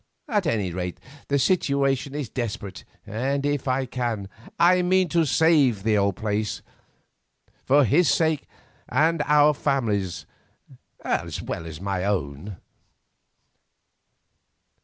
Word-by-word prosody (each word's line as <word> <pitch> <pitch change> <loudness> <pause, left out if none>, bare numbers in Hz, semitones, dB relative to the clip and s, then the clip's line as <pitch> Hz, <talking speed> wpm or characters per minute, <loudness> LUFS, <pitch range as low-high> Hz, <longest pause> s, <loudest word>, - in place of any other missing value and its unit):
At 205 -6 0
any 105 -10 0
rate 90 0 -4 0.3
the 140 - +1
situation 140 -3 +1
is 145 -4 -3
desperate, 105 -7 -5 0.2
and 135 +6 -2
if 145 -2 -1
I 130 +1 +1
can, 120 -6 -3 0.3
I 180 +1 +5
mean 185 0 +2
to 165 0 +2
save 140 - +3
the 110 0 +2
old 100 -2 +1
place, 105 +1 -2 1.0
for 140 +1 +4
his 145 - +3
sake 160 +2 +1 0.4
and 160 +4 +2
our 150 0 +5
family's, 110 - -1 0.8
as - - -2
well 80 - -5
as 80 -1 -8
my 95 -1 -2
own." 90 -1 -3
130 Hz, 115 wpm, -24 LUFS, 100-150 Hz, 1.0 s, I